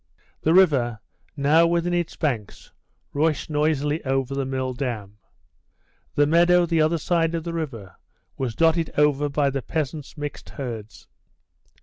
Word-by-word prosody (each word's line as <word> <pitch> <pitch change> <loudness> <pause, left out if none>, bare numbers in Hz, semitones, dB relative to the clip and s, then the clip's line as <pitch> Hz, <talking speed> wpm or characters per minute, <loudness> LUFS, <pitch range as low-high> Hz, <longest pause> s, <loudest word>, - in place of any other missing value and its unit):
The 160 +2 +3
river, 135 - +4 0.4
now 155 +4 +4
within 170 +1 0
its 175 -2 -1
banks, 120 -9 -3 0.4
rushed 155 +1 0
noisily 150 0 0
over 135 0 -1
the 135 -1 -2
mill 130 -1 -2
dam. 110 -6 -5 1.0
The 145 - +4
meadow 175 +3 +4
the 165 -1 +1
other 155 +2 +2
side 165 0 0
of 165 - -3
the 170 0 -4
river 125 - -5 0.4
was 125 -4 -3
dotted 165 0 +2
over 145 0 +3
by 140 -1 +1
the 135 0 -2
peasants' 150 +1 -4
mixed 145 0 -6
herds. 115 -5 -7
150 Hz, 140 wpm, -24 LUFS, 135-165 Hz, 1.0 s, river